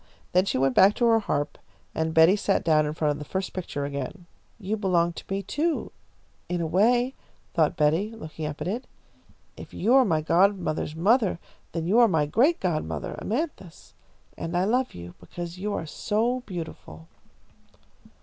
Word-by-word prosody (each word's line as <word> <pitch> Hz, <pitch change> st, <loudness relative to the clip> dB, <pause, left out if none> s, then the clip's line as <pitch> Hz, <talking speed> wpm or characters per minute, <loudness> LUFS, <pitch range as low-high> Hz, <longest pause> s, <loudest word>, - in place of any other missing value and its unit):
Then 185 Hz, +2 st, +3 dB
she 195 Hz, -, -1 dB
went 135 Hz, 0 st, +2 dB
back 195 Hz, +9 st, +6 dB
to 240 Hz, -, +1 dB
her 225 Hz, -1 st, +5 dB
harp, 145 Hz, -8 st, -2 dB, 0.3 s
and 160 Hz, 0 st, -1 dB
Betty 165 Hz, +4 st, +7 dB
sat 200 Hz, -1 st, 0 dB
down 155 Hz, -2 st, +3 dB
in 150 Hz, -, -4 dB
front 155 Hz, -2 st, +1 dB
of 145 Hz, -, -4 dB
the -, -, -5 dB
first 190 Hz, 0 st, -3 dB
picture 155 Hz, -6 st, -4 dB
again. 140 Hz, +6 st, -5 dB, 0.3 s
"You 210 Hz, -1 st, -2 dB
belong 175 Hz, -5 st, +1 dB
to -, -, -9 dB
me, 195 Hz, +1 st, -2 dB
too, 305 Hz, -, -1 dB, 0.6 s
in 180 Hz, 0 st, -1 dB
a 170 Hz, -, -1 dB
way," 240 Hz, +10 st, +2 dB, 0.4 s
thought 160 Hz, 0 st, +2 dB
Betty, 160 Hz, +6 st, +2 dB
looking 160 Hz, -8 st, -7 dB
up 150 Hz, 0 st, -7 dB
at -, -, -2 dB
it. 230 Hz, +7 st, -3 dB, 0.7 s
"If -, -, -11 dB
you 225 Hz, +6 st, +2 dB
are 265 Hz, 0 st, +7 dB
my 165 Hz, -9 st, +1 dB
godmother's 170 Hz, -2 st, +1 dB
mother, 205 Hz, +3 st, +2 dB, 0.3 s
then 165 Hz, -1 st, -3 dB
you 205 Hz, +7 st, +3 dB
are 235 Hz, -, +7 dB
my 160 Hz, -7 st, +2 dB
great 255 Hz, -, +2 dB
godmother, 170 Hz, -5 st, -2 dB
Amanthis, 225 Hz, -, -4 dB, 0.4 s
and 170 Hz, +1 st, -3 dB
I 180 Hz, -, +2 dB
love 250 Hz, +6 st, 0 dB
you 85 Hz, 0 st, -9 dB
because 175 Hz, 0 st, -8 dB
you 210 Hz, +2 st, -2 dB
are -, -, -3 dB
so 225 Hz, +9 st, -1 dB
beautiful." 160 Hz, -, -8 dB
180 Hz, 180 wpm, -26 LUFS, 160-215 Hz, 0.7 s, Betty